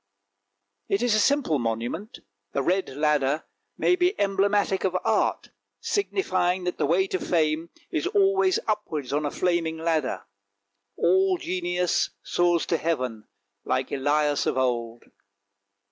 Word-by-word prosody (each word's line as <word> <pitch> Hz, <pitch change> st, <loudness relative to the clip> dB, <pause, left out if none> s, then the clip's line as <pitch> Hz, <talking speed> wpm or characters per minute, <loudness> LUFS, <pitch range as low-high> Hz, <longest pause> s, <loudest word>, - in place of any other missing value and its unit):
It 200 Hz, +4 st, +1 dB
is 245 Hz, -3 st, +2 dB
a 215 Hz, -, +3 dB
simple 250 Hz, -, +2 dB
monument; 120 Hz, -, -4 dB, 0.3 s
the 140 Hz, -, 0 dB
red 185 Hz, +6 st, +1 dB
ladder 150 Hz, -1 st, +1 dB, 0.3 s
might 360 Hz, -, +2 dB
be 360 Hz, +3 st, +1 dB
emblematic 200 Hz, 0 st, +1 dB
of 185 Hz, -1 st, +1 dB
Art, -, -, 0 dB, 0.3 s
signifying 185 Hz, -, 0 dB
that 180 Hz, 0 st, -3 dB
the -, -, +1 dB
way 180 Hz, +5 st, +3 dB
to 185 Hz, -1 st, -2 dB
fame 160 Hz, -1 st, 0 dB, 0.2 s
is 335 Hz, +1 st, -1 dB
always 385 Hz, -2 st, +3 dB
upwards 160 Hz, -, -2 dB
on 150 Hz, +1 st, 0 dB
a -, -, -1 dB
flaming 170 Hz, -1 st, 0 dB
ladder. 160 Hz, -3 st, -1 dB, 0.7 s
All 190 Hz, +1 st, +3 dB
genius 180 Hz, 0 st, 0 dB
soars 175 Hz, -1 st, +1 dB
to 165 Hz, -, 0 dB
heaven, 125 Hz, -10 st, -2 dB, 0.4 s
like 130 Hz, -, -1 dB
Elias 145 Hz, +1 st, +1 dB
of -, -, 0 dB
old. 120 Hz, -2 st, -1 dB
175 Hz, 130 wpm, -25 LUFS, 150-195 Hz, 0.7 s, a